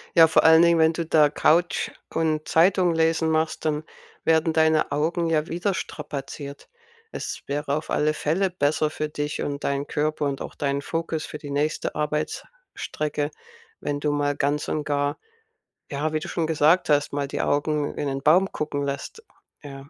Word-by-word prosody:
Ja, 165 Hz, -2 st, +9 dB
vor 160 Hz, -, +3 dB
allen 160 Hz, 0 st, +8 dB
Dingen, 170 Hz, -1 st, +5 dB
wenn 160 Hz, 0 st, +4 dB
du 165 Hz, 0 st, -3 dB
da 155 Hz, -2 st, +4 dB
Couch 170 Hz, +3 st, +2 dB, 0.2 s
und 155 Hz, -1 st, 0 dB
Zeitung 175 Hz, 0 st, +3 dB
lesen 160 Hz, 0 st, +2 dB
machst, 160 Hz, 0 st, 0 dB
dann 155 Hz, -1 st, 0 dB, 0.4 s
werden 160 Hz, 0 st, +3 dB
deine 160 Hz, -1 st, +2 dB
Augen 165 Hz, +4 st, 0 dB
ja 155 Hz, -1 st, +1 dB
wieder 175 Hz, +5 st, -1 dB
strapaziert. 140 Hz, -3 st, -6 dB, 0.4 s
Es -, -, -5 dB
wäre 145 Hz, 0 st, -2 dB
auf 155 Hz, -, -5 dB
alle 155 Hz, +1 st, +1 dB
Fälle 170 Hz, +5 st, 0 dB
besser 155 Hz, -2 st, +1 dB
für 155 Hz, 0 st, -3 dB
dich 150 Hz, 0 st, -3 dB
und 140 Hz, 0 st, -4 dB
deinen 140 Hz, +1 st, -1 dB
Körper 150 Hz, 0 st, -1 dB
und 135 Hz, -1 st, -2 dB
auch -, -, -8 dB
deinen 140 Hz, 0 st, -1 dB
Fokus 165 Hz, 0 st, -3 dB
für 150 Hz, -, -7 dB
die 145 Hz, -2 st, -9 dB
nächste 150 Hz, +2 st, -1 dB
Arbeitsstrecke, 150 Hz, -, -3 dB, 0.5 s
wenn 145 Hz, 0 st, -3 dB
du 150 Hz, 0 st, 0 dB
mal 145 Hz, -1 st, 0 dB
ganz 145 Hz, +1 st, 0 dB
und 150 Hz, -, -1 dB
gar, 145 Hz, 0 st, -1 dB, 0.7 s
ja, 150 Hz, +2 st, -2 dB
wie 155 Hz, -, +1 dB
du -, -, -7 dB
schon 165 Hz, -, -1 dB
gesagt 160 Hz, +3 st, +3 dB
hast, 145 Hz, 0 st, +2 dB
mal 140 Hz, 0 st, -2 dB
die -, -, -3 dB
Augen 145 Hz, 0 st, 0 dB
in -, -, -2 dB
'nen 135 Hz, 0 st, -3 dB
Baum 180 Hz, +7 st, +4 dB
gucken 145 Hz, -2 st, -3 dB
lässt, 140 Hz, -, -5 dB, 0.4 s
ja. 140 Hz, -1 st, -10 dB
155 Hz, 180 wpm, -24 LUFS, 145-160 Hz, 0.7 s, Ja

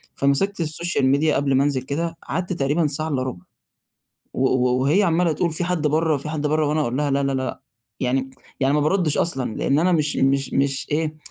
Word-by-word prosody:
فمسِكت 155 Hz, +9 st, +1 dB
السوشيال 165 Hz, -1 st, 0 dB
ميديا 145 Hz, +3 st, +2 dB
قَبل 140 Hz, -1 st, +1 dB
ما 135 Hz, -, +4 dB
أنزِل 140 Hz, -3 st, 0 dB
كده 165 Hz, +5 st, -3 dB
قعَدت 180 Hz, +2 st, -2 dB
تقريبًا 150 Hz, +2 st, +1 dB
ساعة 155 Hz, +2 st, -3 dB
إلّا 130 Hz, -3 st, -1 dB
رُبع 120 Hz, -9 st, -6 dB, 0.9 s
و 130 Hz, +1 st, +2 dB
و 125 Hz, 0 st, +1 dB
وهي 155 Hz, +10 st, +3 dB
عمّالة 170 Hz, -2 st, +2 dB
تقول: 170 Hz, +3 st, 0 dB
"في 175 Hz, +2 st, -1 dB
حَد 175 Hz, -4 st, -1 dB
برّه، 155 Hz, 0 st, +2 dB
في 140 Hz, +3 st, -6 dB
حَد 150 Hz, -1 st, -2 dB
برّه؟" 155 Hz, 0 st, +1 dB
وأنا 150 Hz, +1 st, 0 dB
أقول 125 Hz, -3 st, -1 dB
لها 145 Hz, -1 st, 0 dB
لا، 140 Hz, +1 st, +1 dB
لا، 135 Hz, 0 st, 0 dB
لأ، 130 Hz, -1 st, -3 dB, 0.4 s
يعني 130 Hz, +1 st, 0 dB, 0.3 s
يعني 135 Hz, +2 st, +2 dB
ما 150 Hz, -, +2 dB
بارُدِّش 155 Hz, 0 st, +1 dB
أصلًا 130 Hz, -9 st, -1 dB
لأن 140 Hz, +2 st, +1 dB
أنا 180 Hz, +2 st, +2 dB
مش 150 Hz, -3 st, +1 dB
مش 135 Hz, 0 st, +1 dB
مش 140 Hz, +1 st, 0 dB
إيه، 155 Hz, +1 st, -1 dB
145 Hz, 210 wpm, -22 LUFS, 135-160 Hz, 0.9 s, ما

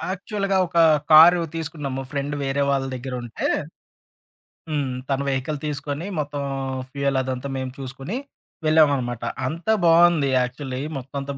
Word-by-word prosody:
యాక్చువల్‌గా 200 Hz, 0 st, -2 dB
ఒక 170 Hz, 0 st, -2 dB, 0.3 s
కారు 170 Hz, +3 st, +9 dB
తీసుకున్నాము. 145 Hz, -5 st, -4 dB
ఫ్రెండ్ 145 Hz, +1 st, -2 dB
వేరే 135 Hz, +1 st, 0 dB
వాళ్ళ 135 Hz, -1 st, +1 dB
దెగ్గరుంటే. 125 Hz, -2 st, -4 dB, 1.2 s
హ్మ్. 145 Hz, -3 st, -1 dB, 0.2 s
తను 135 Hz, 0 st, 0 dB
వెహికల్ 135 Hz, +2 st, -1 dB
తీసుకొని 145 Hz, +3 st, -4 dB
మొత్తం 145 Hz, -1 st, -3 dB, 0.5 s
ఫ్యూయల్ 140 Hz, -1 st, 0 dB
అదంతా 130 Hz, +1 st, -4 dB
మేము 130 Hz, -1 st, -3 dB
చూసుకొని. 135 Hz, -, -5 dB, 0.5 s
వెళ్ళామనమాట. 140 Hz, -7 st, +3 dB, 0.2 s
అంతా 170 Hz, +10 st, 0 dB
బావుంది 165 Hz, -3 st, +5 dB
యాక్చువల్‌లీ 130 Hz, +1 st, -3 dB, 0.2 s
మొత్తం 135 Hz, +1 st, -8 dB
అంతా 140 Hz, 0 st, -5 dB
140 Hz, 120 wpm, -23 LUFS, 135-160 Hz, 1.2 s, కారు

